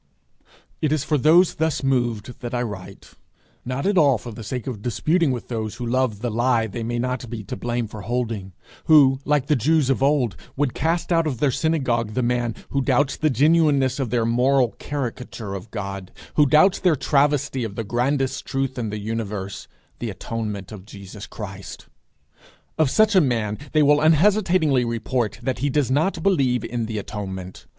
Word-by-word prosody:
It 155 - +1
is 155 -3 +1
for 155 0 0
those 160 +6 +5
thus 160 -3 -1
moved 120 -3 -1
that 120 0 -5
I 120 - 0
write, 100 -4 -8 0.5
not 130 +2 -3
at 200 -2 +3
all 140 -5 +4
for 120 - -9
the 115 +1 -9
sake 125 +2 -4
of 115 -6 -5
disputing 155 - +1
with 125 -3 -3
those 110 -3 -4
who 125 - -5
love 120 -3 0
the 120 -1 -2
lie 120 0 +2
they 110 +2 -6
may 120 +1 -2
not 125 0 -3
be 115 -2 -6
to 100 - -6
blame 120 +2 -2
for 105 0 -9
holding; 110 -4 -3 0.3
who, 140 -4 +6
like 150 -2 +2
the 150 - +2
Jews 145 +2 +2
of 135 - -1
old, 135 - +2 0.2
would 140 -3 0
cast 165 +2 -1
out 165 -1 +3
of 135 -5 -2
their 140 +2 +2
synagogue 120 -8 0
the 130 - +1
man 120 -1 0
who 140 - 0
doubts 135 +1 +1
the 155 - +1
genuineness 145 -1 +3
of 130 -4 -1
their 115 -1 +1
moral 125 +2 +3
caricature 125 -6 -5
of 100 +2 -7
God, 100 -3 -6 0.2
who 150 -1 +4
doubts 155 +7 +5
their 180 -4 +3
travesty 140 -2 +1
of 105 -3 -5
the 115 - -3
grandest 130 +4 -1
truth 135 -1 -2
in 115 -3 -2
the 105 - -4
universe, 105 -2 -4 0.3
the 120 - -3
atonement 105 -1 -5
of 105 -4 -9
Jesus 100 0 -10
Christ. 95 -3 -8 0.9
Of 155 -4 +2
such 215 - +3
a 190 - +6
man 115 -7 -1
they 155 -1 +4
will 145 +1 +4
unhesitatingly 165 -4 +3
report 115 0 -2
that 130 +1 -2
he 145 +3 0
does 140 -2 0
not 160 +4 +1
believe 135 - +2
in 115 -2 -3
the 110 -1 -4
atonement. 95 -3 -6
125 Hz, 190 wpm, -23 LUFS, 110-145 Hz, 0.9 s, who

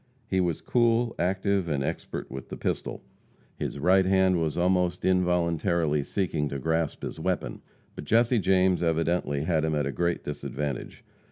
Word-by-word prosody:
He 95 -4 +1
was 85 -3 -1
cool, 120 -1 +2
active 95 +1 0
and 70 -3 0
expert - - -5
with 65 -1 -7
the - - -6
pistol; - - -3 0.6
his - - -3
right 95 +6 +4
hand 95 -2 +3
was 80 -1 -1
almost 90 0 +1
involuntarily 85 -3 +1
seeking 75 -2 -1
to 70 - -4
grasp 80 +2 -1
his - - -5
weapon. - - -2 0.3
But - - -8
Jesse 115 - +3
James 95 -1 +3
evidently 80 -3 0
had 80 -2 +1
him 80 -1 0
at 75 -1 0
a 70 - -1
great 85 +3 -1
disadvantage. 70 -3 -5
85 Hz, 160 wpm, -27 LUFS, 75-95 Hz, 0.6 s, right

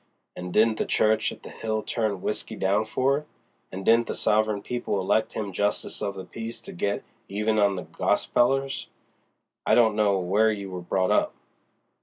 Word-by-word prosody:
An' 90 0 -6
didn't 110 +4 +3
the - - +1
church 110 0 +2
at - - -12
the - - -9
Hill 110 -1 -3
turn 105 -5 -1
W'isky 105 +1 -3
down 100 +3 +2
for 130 +5 +1
it? 150 - -16 0.4
And 95 +1 -6
didn't 115 +1 +5
the - - -3
sovereign 105 -1 +1
people 120 -5 -2
elect 105 +4 +1
him 105 -3 -3
Justice 105 +2 -1
of 100 -2 -2
the 95 -1 -7
Peace 115 0 -7
to - - -10
get 100 +4 -1 0.3
even 105 +2 0
on 100 -1 +3
the 90 - -4
gospelers? 135 +2 +1 0.8
I - - +3
don't 110 -3 +4
know 105 -2 +3
where 100 +5 +3
you 100 -2 -5
were 90 -1 -5
brought 95 +1 0
up." - - +2
105 Hz, 185 wpm, -26 LUFS, 100-110 Hz, 0.8 s, didn't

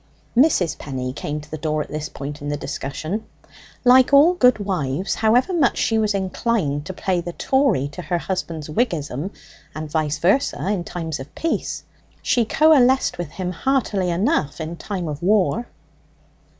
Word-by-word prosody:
Mrs. 230 - +3
Penny 130 -2 -4
came 150 +1 -4
to 150 - -16
the 155 - -5
door 155 -1 -1
at - - -15
this 150 0 -4
point 145 +1 -7
in 145 - -4
the 145 - -1
discussion. 155 +9 -4 0.6
Like 255 +1 +6
all 290 +5 +7
good 250 -9 +4
wives, 185 -5 -2
however 240 - +2
much 305 -7 +2
she 225 -1 +1
was 210 -2 +1
inclined 185 -6 -1
to 190 - -5
play 185 -2 -1
the 175 0 -6
Tory 265 - +1
to 180 - -8
her 175 +1 -1
husband's 170 -4 -4
Whiggism, 155 - -1 0.5
and 155 -1 -6
vice 155 -2 0
versa, 195 +1 +1
in 200 -4 0
times 160 -3 -4
of 135 +2 -10
peace, 330 - -2 0.4
she 240 -3 +2
coalesced 265 - +4
with 175 -4 -3
him 180 +3 -4
heartily 205 -3 0
enough 175 - 0
in 160 +1 -4
time 185 -1 -4
of 150 -1 -5
war. 210 +5 +2
180 Hz, 165 wpm, -22 LUFS, 150-230 Hz, 0.6 s, all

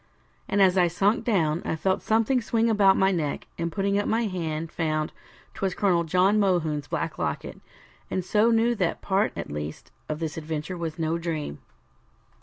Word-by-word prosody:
And 200 -1 +4
as 190 0 +4
I 175 - +5
sunk 195 +6 +1
down, 170 -8 +1
I - - -1
felt 190 +4 0
something 225 +3 +2
swing 230 0 +1
about 200 -3 +5
my 190 0 +4
neck, 155 -6 -2
and 170 0 -1
putting 200 +3 0
up 205 - -1
my 230 +1 +1
hand, 165 -5 -3
found 155 -2 -1 0.4
'twas 190 -2 -2
Colonel 175 -4 +2
John 185 +5 +3
Mohune's 160 -7 +1
black - - -3
locket, - - -3 0.5
and 185 -2 -2
so 215 +4 +3
knew 230 +1 +3
that 185 -7 -1
part 200 +2 +1
at - - -5
least 75 +1 -6 0.2
of 155 - -2
this 160 -1 -4
adventure 155 +2 -4
was 165 -3 -4
no 165 0 -1
dream. 160 - -4
180 Hz, 180 wpm, -26 LUFS, 160-200 Hz, 0.5 s, I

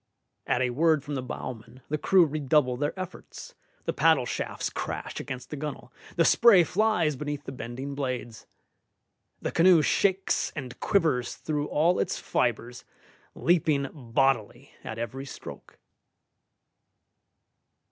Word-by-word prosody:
At 125 - +2
a 125 - 0
word 155 +2 +2
from 145 - -6
the 135 - -2
bowman 125 0 -8
the 150 - 0
crew 185 +1 +5
redouble 145 -3 +1
their 145 +8 -3
efforts, 185 -2 -8 0.3
the - - -1
paddle - - +3
shafts - - -3
crash - - -5
against 130 -1 -7
the - - -3
gunwale, 150 0 -6 0.2
the 165 - +3
spray 215 -4 +6
flies 180 -4 +1
beneath 145 +1 -4
the - - -7
bending 130 +2 -6
blades. 125 -5 -4 1.0
The - - -1
canoe 170 -2 +5
shakes 190 +3 +1
and 130 -5 -7
quivers 155 -11 +1
through 150 -1 -3
all 170 +4 +2
its - - -1
fibres, 120 0 -2 0.5
leaping 155 -5 +2
bodily 125 -3 -1
at 110 - -6
every 125 +4 -5
stroke. - - -10
145 Hz, 130 wpm, -27 LUFS, 125-160 Hz, 1.0 s, spray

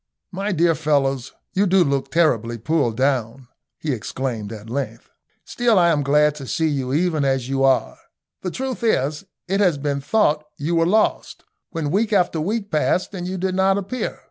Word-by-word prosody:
"My 200 +2 -2
dear 170 -1 +3
fellows, 140 -5 0 0.2
you 200 +1 +2
do 185 0 +4
look 140 -3 -1
terribly 120 -8 +1
pulled 120 -2 0
down," 130 -2 0 0.3
he 155 - -3
exclaimed 115 -2 -4
at 110 -1 -9
length. 115 -2 -5 0.3
"Still 235 -3 +1
I 175 -1 +5
am 155 -3 +2
glad 150 +2 +3
to 135 - -8
see 160 0 0
you 135 -3 -2
even 160 0 +1
as 135 -2 0
you 135 0 0
are. 135 -1 +2 0.4
The 185 - -3
truth 260 +4 -4
is 150 - +1
that 195 - -19 0.3
it 195 - +2
has 180 -7 +3
been 140 0 -2
thought 150 -3 +2
you 155 +4 -2
were 165 0 +3
lost, 215 +4 +1 0.3
when 155 -4 -3
week 215 +5 +1
after 180 -5 +2
week 205 +4 -2
passed 175 +6 +1
and 180 -2 -5
you 190 +1 -3
did 185 +1 -1
not 190 +1 +3
appear. 200 +6 -3
155 Hz, 190 wpm, -21 LUFS, 135-185 Hz, 0.4 s, I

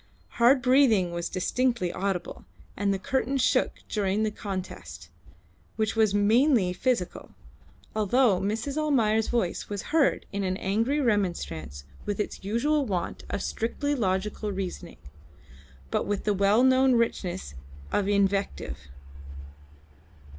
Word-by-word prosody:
Hard 255 +2 +5
breathing 250 -9 +4
was 170 0 -3
distinctly 235 0 0
audible, 195 -2 -3 0.3
and 200 0 0
the 195 - 0
curtain 265 +6 -1
shook 255 - +1
during 205 0 0
the 215 - 0
contest, 90 - -7 0.7
which 220 0 -1
was 220 -2 +3
mainly 210 0 +3
physical, 235 -4 -2 0.6
although 215 -1 +3
Mrs. 225 +8 -2
Almayer's 225 -8 +2
voice 230 -8 -1
was 205 -2 -4
heard 315 -4 +3
in 200 0 -2
angry 225 +10 0
remonstrance 175 - -1 0.2
with 205 -1 -2
its 210 - -4
usual 280 +9 +1
want 180 -4 -3
of 200 - -3
strictly 285 +6 -2
logical 210 -2 -1
reasoning, 190 -2 -5 0.9
but - - 0
with 205 -1 -2
the 210 - +1
well 200 +4 +3
known 260 0 +5
richness 190 - -1 0.4
of 200 - +1
invective. 200 - 0
210 Hz, 120 wpm, -27 LUFS, 190-245 Hz, 0.9 s, Hard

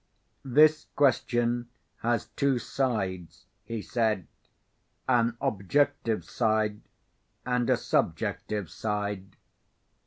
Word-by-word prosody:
"This 150 +4 +4
question 120 -3 +2 0.3
has 120 +1 -1
two 140 -2 +1
sides," 100 -10 -2 0.2
he 115 -2 -5
said. 110 -6 0 0.8
"An 120 -2 +2
Objective 115 +3 0
side, 110 -2 0 0.6
and 125 -1 0
a - - +4
Subjective 105 -4 -1
side. 105 -2 -3
115 Hz, 85 wpm, -28 LUFS, 105-125 Hz, 0.8 s, This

